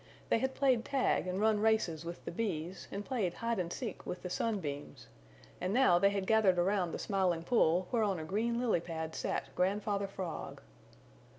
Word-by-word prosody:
They - - +3
had 265 +1 -1
played 260 -4 +3
tag 265 -8 +1
and 185 +1 -2
run 215 0 +3
races 210 -8 +1
with 170 +1 -7
the - - -4
Bees 175 -3 -3
and 200 +1 -4
played 215 -10 -1
hide 230 -2 -1
and 175 -1 -2
seek 225 -3 -5
with 180 - -6
the 180 - -5
Sun 220 +2 0
Beams, 145 -4 -6 0.6
and 185 +4 0
now 245 -10 +5
they 200 +2 +5
had 200 -1 -2
gathered 210 -4 +4
around 180 -1 +1
the - - -3
Smiling 185 -4 0
Pool 180 -4 +3
where 235 - +2
on 200 -4 +1
a 160 - -5
green 225 +8 0
lily 235 -8 +2
pad 160 -1 -5
sat - - -3
Grandfather 200 +2 0
Frog. 185 -5 -6
195 Hz, 195 wpm, -33 LUFS, 175-220 Hz, 0.6 s, now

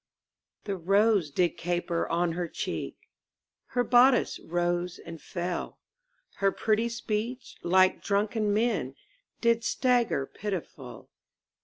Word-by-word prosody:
The 200 -2 -3
rose 195 0 +3
did 175 +4 0
caper 175 -1 -1
on 170 +1 +1
her 175 +1 -3
cheek, - - -4 0.7
Her 245 - 0
bodice 245 +2 +4
rose 175 +1 -1
and 165 -1 -10
fell, 175 0 -4 0.6
Her 195 0 +2
pretty 220 +3 +1
speech, 235 +2 -4
like 185 +1 +3
drunken 210 +1 0
men, 210 - 0 0.5
Did 235 -1 +3
stagger 240 - +1
pitiful. 170 -9 -7
195 Hz, 110 wpm, -28 LUFS, 175-230 Hz, 0.7 s, bodice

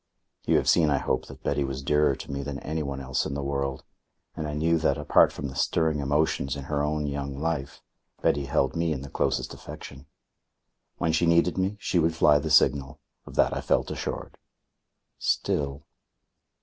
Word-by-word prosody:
You - - +4
have - - 0
seen, 80 -3 +5
I 70 - +3
hope, - - -1
that - - -12
Betty 70 - 0
was 65 0 -4
dearer 75 0 +3
to 70 - -8
me 70 0 -3
than 70 0 -5
anyone 75 -3 -3
else 65 -1 -1
in 70 - -4
the 70 - -3
world, 70 -1 -2 0.5
and 80 - -3
I 75 - -4
knew 80 +2 +2
that, 80 - +1
apart - - +4
from 70 - -5
the 65 - -7
stirring 80 +2 +1
emotions 70 -1 0
in 70 - -6
her 70 +1 -1
own 75 0 -1
young 70 -1 -4
life, 75 -2 -3 0.4
Betty 70 -1 +1
held 70 -1 +1
me 85 -1 +1
in 70 -2 -5
the 70 - -9
closest - - -1
affection. 70 +1 -10 0.9
When 80 -2 +1
she 85 +2 +2
needed 85 +1 +3
me, 95 +2 -1
she 95 -4 +1
would 80 0 +2
fly 75 -2 +5
the - - -3
signal. 70 -2 +3 0.3
Of - - -10
that - - +3
I - - -2
felt - - +1
assured. - - -5 0.8
Still... 70 -1 -1
70 Hz, 190 wpm, -27 LUFS, 70-80 Hz, 0.9 s, seen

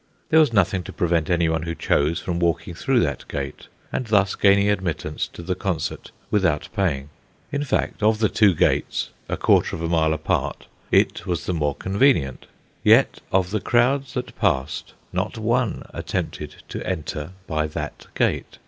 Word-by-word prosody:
There 160 -2 +6
was 150 -5 +5
nothing 95 -3 +2
to - - -7
prevent 85 -3 0
anyone 85 -2 +2
who 85 0 -4
chose 80 +3 +1
from 85 -1 -3
walking 85 0 0
through 125 +8 +1
that 70 -5 -1
gate, 70 -1 -5 0.3
and 125 - -2
thus 100 -3 +3
gaining 100 0 +4
admittance 85 -7 -1
to 85 - -11
the 90 +2 -1
concert 95 -2 -3 0.2
without 90 -8 +1
paying. 75 -8 -1 0.4
In 145 0 -1
fact, 140 - -1
of 110 +1 +4
the 110 0 +3
two 105 -5 +4
gates - - +1 0.3
quarter - - +3
of 85 - -6
a - - 0
mile 80 -2 +2
apart 80 0 -1 0.2
it 95 - +2
was 85 -4 -2
the 90 - -1
more 75 -4 0
convenient. 95 - +1 0.4
Yet - - +5
of 95 -1 +2
the 110 -1 -1
crowds 125 +2 +2
that 125 - -4
passed, 65 +2 -1 0.2
not - - -2
one - - 0
attempted - - -4
to - - -5
enter 80 -2 -4
by 80 -2 -1
that 75 - -6
gate. - - 0
90 Hz, 165 wpm, -23 LUFS, 80-105 Hz, 0.4 s, There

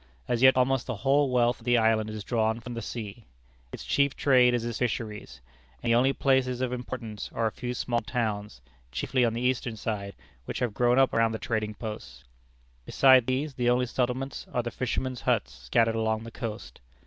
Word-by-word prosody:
As 120 -1 0
yet 130 0 +7
almost 130 0 +2
the - - -2
whole 135 +6 +2
wealth 120 -1 +2
of - - -17
the 120 -1 +4
island 110 -1 +2
is 110 -1 -6
drawn 110 -1 0
from 120 +1 -8
the 115 - -4
sea. 110 0 -7 0.5
Its - - -8
chief 140 -1 +1
trade 125 -3 +4
is 120 -1 -2
its 120 -1 -4
fisheries, 110 - -4 0.4
and 115 - +1
the - - +5
only 130 +3 +4
places 130 -2 +1
of 125 -1 -1
importance 120 -4 -6
are 115 - 0
a 110 - +1
few 125 +2 -5
small 120 0 -1
towns, 105 - -3 0.3
chiefly 125 - 0
on 115 -2 +2
the 115 - -3
eastern 125 -2 0
side, 100 -2 -4 0.3
which - - -5
have 125 -4 -1
grown 120 +2 +2
up 135 -1 +4
around 115 0 +2
the - - -2
trading 110 -1 -2
posts. 110 -1 -8 0.6
Besides 130 - +5
these, 135 +3 -1
the 120 -1 0
only 125 +1 +2
settlements 125 +2 -3
are 120 - -1
the 120 - -4
fishermen's 130 +1 -3
huts - - 0
scattered 65 - +1
along 110 0 -1
the 115 - -9
coast. 115 -2 -7
120 Hz, 200 wpm, -27 LUFS, 110-125 Hz, 0.6 s, yet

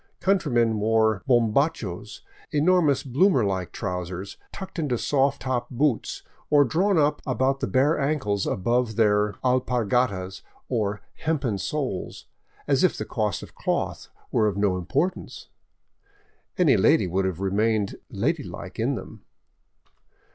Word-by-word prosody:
Countrymen 120 - +2
wore 110 -1 +2
homhachos, 115 - 0 0.3
enormous 155 -2 +3
bloomer 135 - +3
like 95 -3 -2
trousers, 90 0 -5 0.2
tucked 190 -2 -7
into 140 -6 0
soft 135 +2 +1
top 125 -2 -2
boots 130 -1 -1 0.3
or 145 -1 +6
drawn 180 - +1
up 150 -1 +2
about 135 +1 0
the - - -1
bare 145 +4 +2
ankles 135 -9 0
above 120 +3 0
their 105 -2 +2
alpargatas, 125 -6 0 0.3
or 105 -4 -1
hempen 140 -10 -1
soles, 130 -6 -4 0.4
as - - +2
if - - +3
the - - -4
cost - - -2
of - - -12
cloth - - -2 0.2
were 110 - +3
of 100 -2 -2
no 100 -2 +2
importance. 90 - -2 1.1
Any 155 -10 +4
lady 105 +4 +4
would 95 +2 0
have 95 -2 -2
remained 105 +1 0
ladylike - - -3
in - - +1
them. - - -9
120 Hz, 125 wpm, -25 LUFS, 100-145 Hz, 1.1 s, or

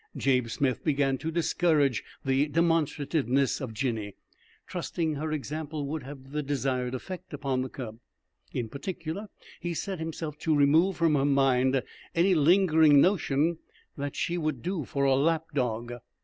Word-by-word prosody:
Jabe 125 -3 +2
Smith 130 +1 -1
began 140 -3 +1
to 160 - -3
discourage 155 -7 +2 0.2
the 135 +2 +2
demonstrativeness 150 -4 +1
of 130 -4 -4
Jinny, 110 -4 -3 0.5
trusting 160 -2 -2
her 155 +2 -3
example 155 0 -4
would 155 +2 -3
have 135 0 -10
the 150 +1 -1
desired 130 -3 -1
effect 180 +3 -7
upon 135 -3 -1
the 130 - -3
cub. 115 -4 -7 0.5
In 120 - -2
particular, 170 - -5 0.3
he 175 -1 -3
set 190 +1 -3
himself 160 -2 -5
to 155 -1 +1
remove 155 +6 +4
from 165 -2 +3
her 140 -2 +2
mind 135 -2 +3 0.3
any 180 +3 +4
lingering 160 -2 +5
notion 160 -2 +2 0.4
that 145 0 -4
she 175 +1 -1
would 155 -6 -2
do 180 -5 -2
for 140 - -2
a 135 -1 +4
lap 160 +3 +2
dog. 120 -3 -1
145 Hz, 150 wpm, -28 LUFS, 135-160 Hz, 0.5 s, lingering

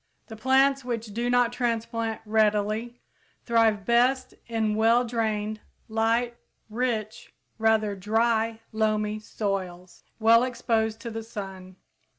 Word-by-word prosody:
The 220 - -7
plants, 270 +3 +3
which 230 -4 -4
do 240 +3 -1
not 245 -1 +3
transplant 230 -2 -2
readily, 215 +2 +1 0.5
thrive 225 -4 +2
best 250 +2 +2
in 220 -2 0
well 230 +3 +3
drained, 220 -2 -2 0.3
light, 230 +2 +1 0.4
rich, 220 -2 -3 0.2
rather 220 -2 +2
dry, 225 +3 0
loamy 215 -1 0
soils 185 -4 -5
well 230 +1 +5
exposed 225 -3 -1
to 235 - -6
the 225 0 -4
sun. 195 -4 -8
225 Hz, 115 wpm, -26 LUFS, 215-235 Hz, 0.5 s, well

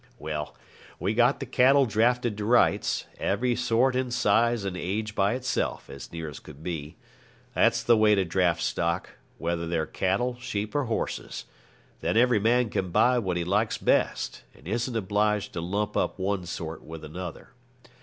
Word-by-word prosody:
Well, 75 -4 -5 0.4
we 95 +6 0
got 120 +4 +3
the 135 - -4
cattle 135 +2 +4
drafted 120 +1 +1
to 105 - -2
rights, 120 +2 +3
every 120 +5 +1
sort 125 +2 +2
and 130 -1 -1
size 115 -1 +2
and 95 -2 -3
age 105 +4 -3
by 100 +3 +2
itself, 130 0 -2
as 70 - -9
near 80 -1 -5
as 75 - -8
could 75 0 -13
be. 80 -4 -5 0.6
That's - - +3
the 120 - +5
way 110 -1 +5
to 95 -2 +1
draft 85 -1 +1
stock, 85 +3 -1 0.3
whether 85 0 -2
they're 80 -2 0
cattle, 120 +7 -1
sheep, 105 -4 -4
or 145 -2 +1
horses; 115 -2 -3 0.5
then - - 0
every 120 -2 +4
man 115 +1 +2
can 95 - -1
buy 125 +8 +4
what 95 -6 -1
he 85 - 0
likes 105 +5 +1
best, - - 0
and 80 - -15
isn't 120 +4 -2
obliged 105 0 0
to 85 - -3
lump 100 +4 -2
up - - 0
one 95 -2 -2
sort 80 -1 -5
with 80 0 -9
another. 85 +2 -7
105 Hz, 175 wpm, -27 LUFS, 85-120 Hz, 0.6 s, the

